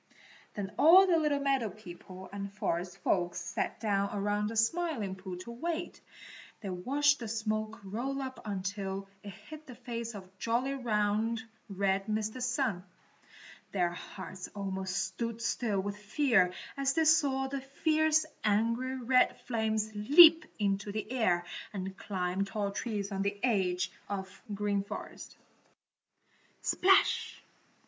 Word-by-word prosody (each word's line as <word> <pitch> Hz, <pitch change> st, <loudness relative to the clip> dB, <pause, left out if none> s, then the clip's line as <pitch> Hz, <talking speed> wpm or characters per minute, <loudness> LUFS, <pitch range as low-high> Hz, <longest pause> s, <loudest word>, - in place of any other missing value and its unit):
Then 200 Hz, -1 st, -4 dB
all 350 Hz, +6 st, +9 dB
the 345 Hz, -3 st, +3 dB
little 300 Hz, -2 st, +2 dB
meadow 270 Hz, -5 st, +1 dB
people 185 Hz, -1 st, -11 dB
and 200 Hz, 0 st, -5 dB
forest 180 Hz, -2 st, -2 dB
folks 175 Hz, -2 st, +1 dB
sat -, -, -3 dB
down 200 Hz, -2 st, +1 dB
around 205 Hz, 0 st, 0 dB
the 225 Hz, -, -5 dB
Smiling 230 Hz, -, 0 dB
Pool 185 Hz, -1 st, -7 dB
to 235 Hz, -, -8 dB
wait. 335 Hz, +7 st, -4 dB, 0.6 s
They 200 Hz, -4 st, -4 dB
watched 285 Hz, +10 st, +2 dB
the 230 Hz, -, -5 dB
smoke 215 Hz, 0 st, -2 dB
roll 240 Hz, +8 st, -3 dB
up 260 Hz, -1 st, -5 dB
until 195 Hz, -1 st, -3 dB
it 205 Hz, -, -8 dB
hid 305 Hz, -, -11 dB
the 250 Hz, -, -9 dB
face 235 Hz, -1 st, -5 dB
of 190 Hz, -1 st, -11 dB
jolly, 245 Hz, +4 st, 0 dB
round, 220 Hz, -2 st, 0 dB, 0.3 s
red 195 Hz, 0 st, 0 dB
Mr. 215 Hz, +3 st, -2 dB
Sun. 245 Hz, -7 st, 0 dB, 0.9 s
Their 175 Hz, -3 st, +2 dB
hearts 185 Hz, +1 st, -8 dB
almost 190 Hz, -2 st, -3 dB
stood 220 Hz, +4 st, -2 dB
still 225 Hz, -3 st, 0 dB
with 200 Hz, +1 st, -3 dB
fear 210 Hz, -3 st, +3 dB, 0.2 s
as 275 Hz, 0 st, +1 dB
they 325 Hz, -1 st, +3 dB
saw 285 Hz, -4 st, +4 dB
the 275 Hz, 0 st, -4 dB
fierce, 310 Hz, +3 st, +2 dB, 0.2 s
angry, 230 Hz, +5 st, +1 dB
red 255 Hz, 0 st, +3 dB
flames 220 Hz, -2 st, -1 dB
leap 315 Hz, +10 st, +8 dB
into 200 Hz, -1 st, 0 dB
the 215 Hz, +2 st, -4 dB
air 180 Hz, -9 st, +2 dB, 0.3 s
and 190 Hz, -1 st, -4 dB
climb 185 Hz, -1 st, -2 dB
tall 200 Hz, 0 st, -2 dB
trees 205 Hz, -1 st, -3 dB
on 195 Hz, 0 st, -2 dB
the 200 Hz, +1 st, -1 dB
edge 190 Hz, -6 st, +1 dB, 0.2 s
of 190 Hz, -1 st, -5 dB
the 210 Hz, -, -5 dB
Green 200 Hz, -1 st, 0 dB
Forest. 200 Hz, -, -8 dB, 1.2 s
Splash! 385 Hz, +1 st, +3 dB
215 Hz, 140 wpm, -31 LUFS, 195-255 Hz, 1.2 s, all